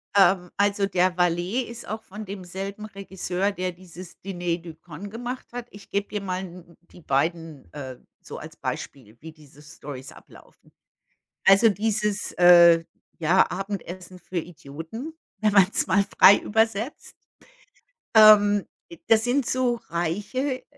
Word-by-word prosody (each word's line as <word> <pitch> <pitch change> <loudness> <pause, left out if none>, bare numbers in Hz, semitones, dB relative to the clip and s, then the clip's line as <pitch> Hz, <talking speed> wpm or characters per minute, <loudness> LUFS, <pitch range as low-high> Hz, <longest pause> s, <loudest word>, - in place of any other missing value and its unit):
Ähm, 190 -2 +4
also, 200 0 +2
der 185 -1 +1
Valet 175 +6 +1
ist 235 0 -9
auch 220 +1 -5
von 210 +3 -9
demselben 195 +2 -7
Regisseur, 195 -1 -3
der 185 -2 -3
dieses 180 0 -13
„Dîner 175 -3 -2
de 170 -1 -10
Cons“ 170 +4 -10
gemacht 245 +3 -6
hat. 245 -1 -6
Ich 205 - -14
gebe 200 0 -2
dir 210 - -4
mal 185 -1 -3
'n 175 -2 -12
die 180 - -15
beiden, 160 +1 -2
äh, 130 -4 -7 0.2
so - - -9
als - - -11
Beispiel, 115 -5 -7
wie 160 +1 -9
diese 150 -2 -19
Stories 145 -4 -10
ablaufen. - - -19 0.8
Also 195 +4 +7
dieses, 210 0 -1
äh, 170 -1 +7 0.3
ja, 170 +3 +3
Abendessen 185 -1 -6
für 175 +1 -5
Idioten, 165 - -8 0.3
wenn 215 -1 +2
man's 200 -1 +4
mal 195 +2 +3
frei 200 - +9
übersetzt, 225 +4 -1 1.0
ähm, 205 -2 +7 0.4
das 225 -1 +4
sind 250 +2 +1
so 250 -2 0
reiche 210 - -2
190 Hz, 140 wpm, -24 LUFS, 170-210 Hz, 1.0 s, frei